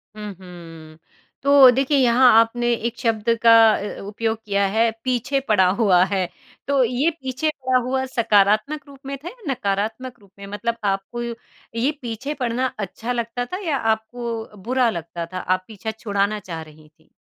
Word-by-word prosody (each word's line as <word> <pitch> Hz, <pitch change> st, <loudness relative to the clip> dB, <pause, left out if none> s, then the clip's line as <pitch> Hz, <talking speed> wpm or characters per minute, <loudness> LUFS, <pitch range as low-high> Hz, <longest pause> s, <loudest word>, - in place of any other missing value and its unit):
हुँ, 210 Hz, -1 st, -7 dB
हुँ। 165 Hz, -3 st, -12 dB, 0.5 s
तो 280 Hz, -2 st, +8 dB
देखिए 270 Hz, +3 st, +1 dB
यहाँ 250 Hz, -1 st, +5 dB
आपने 240 Hz, +1 st, +1 dB
एक 235 Hz, 0 st, -2 dB
शब्द 225 Hz, -1 st, 0 dB
का 230 Hz, -, +7 dB, 0.2 s
अ, 205 Hz, -, -5 dB
उपयोग 225 Hz, +2 st, -2 dB
किया 200 Hz, -1 st, +1 dB
है 230 Hz, +1 st, +4 dB
पीछे 255 Hz, +2 st, 0 dB
पड़ा 190 Hz, -4 st, +4 dB
हुआ 185 Hz, -5 st, +5 dB
है। 190 Hz, -2 st, -1 dB, 0.4 s
तो 280 Hz, -2 st, +3 dB
ये 250 Hz, +7 st, +1 dB
पीछे 265 Hz, +4 st, -1 dB
पड़ा 260 Hz, -4 st, 0 dB
हुआ 260 Hz, +1 st, 0 dB
सकारात्मक 220 Hz, +4 st, +2 dB
रूप 275 Hz, -1 st, -14 dB
में 275 Hz, 0 st, -4 dB
था 305 Hz, +6 st, -11 dB
या 435 Hz, -, -6 dB
नकारात्मक 225 Hz, +2 st, -3 dB
रूप 200 Hz, -2 st, -22 dB
में? 200 Hz, -, -8 dB
मतलब 230 Hz, +3 st, -3 dB
आपको 195 Hz, +4 st, -2 dB, 0.6 s
ये 265 Hz, +5 st, +2 dB
पीछे 240 Hz, +4 st, -4 dB
पड़ना 250 Hz, -2 st, -1 dB
अच्छा 220 Hz, +4 st, -4 dB
लगता 240 Hz, 0 st, -2 dB
था 365 Hz, -, -5 dB
या 285 Hz, -3 st, +1 dB, 0.2 s
आपको 225 Hz, -1 st, -7 dB
बुरा 250 Hz, +1 st, +2 dB
लगता 170 Hz, -3 st, -5 dB
था 185 Hz, -, -3 dB
आप 185 Hz, +1 st, -1 dB
पीछा 220 Hz, 0 st, -6 dB
छुड़ाना 210 Hz, -1 st, -1 dB
चाह 170 Hz, -5 st, -7 dB
रही 155 Hz, -1 st, -15 dB
थीं? -, -, -30 dB
230 Hz, 170 wpm, -22 LUFS, 200-255 Hz, 0.6 s, तो